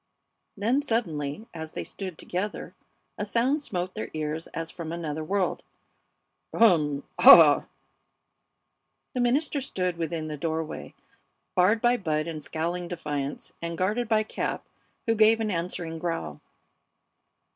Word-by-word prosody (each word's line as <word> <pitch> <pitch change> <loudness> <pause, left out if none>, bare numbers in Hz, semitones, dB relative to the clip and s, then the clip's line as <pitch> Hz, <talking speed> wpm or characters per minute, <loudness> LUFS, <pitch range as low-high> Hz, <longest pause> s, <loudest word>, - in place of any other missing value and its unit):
Then, 235 +8 +2
suddenly, 170 - -2
as 160 -1 -7
they - - -4
stood 185 -5 -7
together, 195 +4 -4 0.5
a - - 0
sound 240 +8 +1
smote 185 -8 -3
their 220 - -5
ears 155 +1 -3
as 165 0 -5
from 165 -2 -6
another 160 -2 -3
world. 190 +3 0 0.9
"Um! 150 -10 +4 0.2
Ah! - - +9 0.7
" - - -52
The 250 - 0
minister 275 +4 +1
stood 180 -9 -2
within 165 -1 -3
the 150 -1 -5
doorway, 160 +1 -4 0.6
barred 205 +5 +3
by 240 +1 +4
Bud 155 -6 -1
in 160 -2 -5
scowling 170 +4 -3
defiance, 145 -5 -4
and 170 0 -4
guarded 215 +7 0
by 215 -1 +3
Cap, - - -3 0.4
who 225 - +3
gave 220 +1 +5
an 220 -2 -1
answering 170 -2 -3
growl. 80 - -3
175 Hz, 135 wpm, -27 LUFS, 160-215 Hz, 0.9 s, Ah